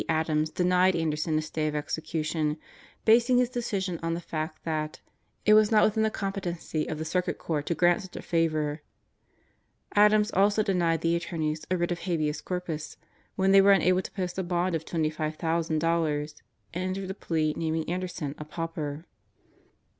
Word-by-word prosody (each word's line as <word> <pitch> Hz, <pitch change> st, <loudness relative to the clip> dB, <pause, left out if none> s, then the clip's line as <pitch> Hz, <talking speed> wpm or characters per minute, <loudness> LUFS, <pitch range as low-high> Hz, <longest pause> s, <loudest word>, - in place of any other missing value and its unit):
Adams 155 Hz, -1 st, +1 dB
denied 180 Hz, +2 st, +3 dB
Anderson 155 Hz, -1 st, 0 dB
a 155 Hz, -, 0 dB
stay 155 Hz, 0 st, -2 dB
of 150 Hz, -, -2 dB
execution, 155 Hz, 0 st, -2 dB, 0.5 s
basing 235 Hz, +3 st, +5 dB
his 250 Hz, 0 st, +2 dB
decision 195 Hz, -8 st, -2 dB
on 165 Hz, 0 st, -1 dB
the -, -, -3 dB
fact 160 Hz, -1 st, -5 dB
that 155 Hz, -1 st, -3 dB, 0.5 s
"it 215 Hz, -, +6 dB
was 215 Hz, -1 st, +6 dB
not 215 Hz, -1 st, +5 dB
within 220 Hz, +1 st, +2 dB
the 220 Hz, -, +3 dB
competency 185 Hz, -6 st, -3 dB
of 155 Hz, -, -3 dB
the 160 Hz, -, -4 dB
Circuit 180 Hz, +3 st, -1 dB
Court 150 Hz, -3 st, -3 dB
to 170 Hz, -, 0 dB
grant 175 Hz, +4 st, +3 dB
such 190 Hz, -2 st, -11 dB
a -, -, -5 dB
favor." 155 Hz, -3 st, 0 dB, 1.1 s
Adams 210 Hz, +1 st, +5 dB
also 205 Hz, +3 st, +3 dB
denied 170 Hz, -5 st, +1 dB
the 165 Hz, 0 st, +2 dB
attorneys 160 Hz, -2 st, -3 dB
a 185 Hz, -, +1 dB
writ 175 Hz, 0 st, -1 dB
of 175 Hz, -, -2 dB
habeas 155 Hz, -4 st, -1 dB
corpus 175 Hz, -4 st, -4 dB, 0.4 s
when 190 Hz, 0 st, +2 dB
they 195 Hz, 0 st, +8 dB
were 200 Hz, +1 st, +7 dB
unable 185 Hz, 0 st, +3 dB
to -, -, -8 dB
post 185 Hz, -2 st, -3 dB
a -, -, 0 dB
bond 175 Hz, +1 st, 0 dB
of 160 Hz, -1 st, -2 dB
$25,000 155 Hz, -1 st, 0 dB, 0.4 s
and 180 Hz, +2 st, -2 dB
entered 190 Hz, -1 st, -4 dB
a -, -, -3 dB
plea 160 Hz, -5 st, -1 dB
naming 160 Hz, -1 st, -2 dB
Anderson 175 Hz, -5 st, -3 dB
a -, -, -4 dB
"pauper." 155 Hz, -1 st, -5 dB
165 Hz, 170 wpm, -28 LUFS, 155-185 Hz, 1.1 s, they